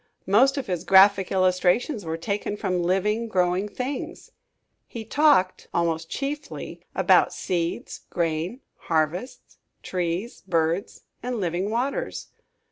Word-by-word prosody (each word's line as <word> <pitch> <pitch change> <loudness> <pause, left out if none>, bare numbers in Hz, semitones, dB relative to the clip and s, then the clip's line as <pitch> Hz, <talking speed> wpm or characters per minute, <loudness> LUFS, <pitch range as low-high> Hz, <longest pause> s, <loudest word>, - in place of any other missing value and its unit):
Most 260 +8 +4
of 275 - -2
his 180 -3 -3
graphic 190 0 +6
illustrations 185 - +2
were 160 0 -3
taken 200 +4 -3
from 185 -4 -1
living, 205 +6 +1
growing 185 0 +1
things. 255 +5 -5 0.6
He 225 -2 -7
talked, 285 -8 +3
almost 165 -1 0
chiefly, 285 +2 -5
about - - +4
seeds, 170 -2 -3
grain, 170 - -2 0.3
harvests, 165 - -2 0.2
trees, 180 +5 -3
birds 165 +2 -1 0.2
and 245 -1 -3
living 180 +1 -1
waters. 270 - -2
190 Hz, 115 wpm, -25 LUFS, 175-230 Hz, 0.6 s, graphic